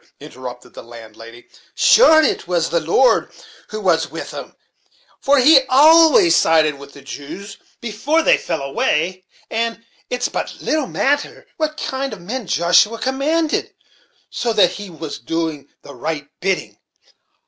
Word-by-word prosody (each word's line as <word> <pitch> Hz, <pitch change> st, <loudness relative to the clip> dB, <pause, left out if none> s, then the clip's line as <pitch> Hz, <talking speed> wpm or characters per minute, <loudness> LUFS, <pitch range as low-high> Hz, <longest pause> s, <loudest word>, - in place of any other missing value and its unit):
interrupted 125 Hz, -1 st, -10 dB
the -, -, -10 dB
landlady; 115 Hz, 0 st, -13 dB, 0.3 s
"sure, 320 Hz, -10 st, +6 dB
it -, -, -1 dB
was 170 Hz, -3 st, -1 dB
the 170 Hz, -, +2 dB
Lord 170 Hz, +11 st, +2 dB, 0.4 s
who 435 Hz, -, -6 dB
was -, -, +1 dB
with -, -, -8 dB
'em; -, -, -9 dB, 0.6 s
for 285 Hz, +1 st, +2 dB
he 270 Hz, +2 st, +6 dB
always 325 Hz, -, +6 dB
sided 155 Hz, -3 st, +2 dB
with 140 Hz, 0 st, -13 dB
the 140 Hz, -, -14 dB
Jews, 180 Hz, +9 st, -9 dB, 0.2 s
before 250 Hz, +9 st, -1 dB
they -, -, +5 dB
fell 160 Hz, -5 st, -4 dB
away; 165 Hz, +6 st, -1 dB, 0.3 s
and 230 Hz, 0 st, -3 dB, 0.2 s
it's 250 Hz, 0 st, -1 dB
but -, -, -5 dB
little 305 Hz, -4 st, -1 dB
matter 285 Hz, +4 st, -2 dB
what 310 Hz, -1 st, -2 dB
kind 265 Hz, -1 st, -4 dB
of 200 Hz, -, -10 dB
men 225 Hz, +4 st, -6 dB
Joshua 175 Hz, -, +3 dB
commanded, 295 Hz, +6 st, -1 dB, 0.6 s
so 235 Hz, -2 st, -2 dB
that 180 Hz, -5 st, +4 dB
he 205 Hz, -1 st, -8 dB
was 160 Hz, -3 st, -8 dB
doing 155 Hz, +1 st, -4 dB, 0.2 s
the 140 Hz, -, -12 dB
right 150 Hz, +3 st, -5 dB
bidding. 190 Hz, 0 st, -3 dB
200 Hz, 145 wpm, -18 LUFS, -, 0.6 s, sure